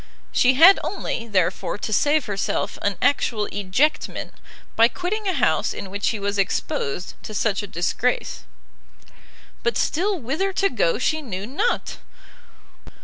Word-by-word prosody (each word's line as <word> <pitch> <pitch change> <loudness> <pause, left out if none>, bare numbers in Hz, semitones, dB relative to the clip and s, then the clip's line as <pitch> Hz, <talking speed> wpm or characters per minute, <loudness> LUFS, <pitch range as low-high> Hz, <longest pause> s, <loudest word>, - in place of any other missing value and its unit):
She 255 +1 +4
had 340 +8 +8
only, 230 - -3
therefore, 190 -3 0
to 215 - -3
save 295 +4 +2
herself 200 -2 -2
an 200 -2 -1
actual 230 -6 +2
ejectment, 205 +10 0 0.4
by 230 +1 +6
quitting 385 - -3
a 375 - +1
house - - +1
in 190 - -7
which 200 +1 -3
she 220 - 0
was 200 0 -2
exposed 180 -3 -2
to 215 - -8
such 205 -1 +1
a 205 - -6
disgrace. 190 +8 -1 1.2
But 455 - 0
still 375 +3 0
whither 310 +10 -1
to 395 +1 +2
go - - +1
she 315 0 0
knew 200 -8 -5
not! 350 - -1
240 Hz, 145 wpm, -23 LUFS, 200-340 Hz, 1.2 s, had